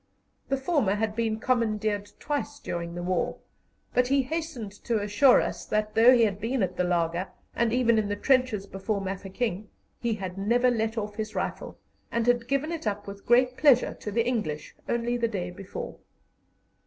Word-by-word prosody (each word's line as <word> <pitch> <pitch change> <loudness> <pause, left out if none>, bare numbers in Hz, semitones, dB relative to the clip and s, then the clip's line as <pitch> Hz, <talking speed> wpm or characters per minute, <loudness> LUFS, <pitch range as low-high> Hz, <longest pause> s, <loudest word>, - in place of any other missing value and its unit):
The 275 - +1
former 265 - +1
had 215 0 -1
been 225 -1 0
commandeered 215 -4 0
twice 290 0 -3
during 170 -6 -5
the 175 - -4
war, 180 -1 0 0.6
but 250 0 +3
he 275 +1 +3
hastened 290 -7 -4
to 230 -2 +1
assure 210 +6 +5
us - - -3
that, 215 0 0
though 230 +3 +7
he 245 -2 +5
had 205 -2 0
been 230 +1 0
at 185 -1 -2
the 180 - +1
laager, 175 +1 0 0.3
and 235 -1 +2
even 235 -2 +3
in 210 - 0
the 205 - 0
trenches 255 -3 +2
before 200 +1 -3
Mafeking, 195 +2 -3 0.3
he 235 -2 0
had 190 -2 -6
never 240 +5 +3
let 225 -1 -1
off 210 -1 -3
his 215 -1 -4
rifle, - - -3 0.3
and 235 -1 0
had 240 -1 +2
given 275 +4 0
it 325 -8 -4
up 205 0 -2
with 200 0 -10
great 250 +1 +4
pleasure 275 -5 +5
to - - -5
the 230 +2 +1
English 210 -12 -2 0.2
only 240 +1 0
the 235 -1 +1
day 180 -5 -3
before. 190 +1 -7
220 Hz, 185 wpm, -27 LUFS, 200-245 Hz, 0.6 s, though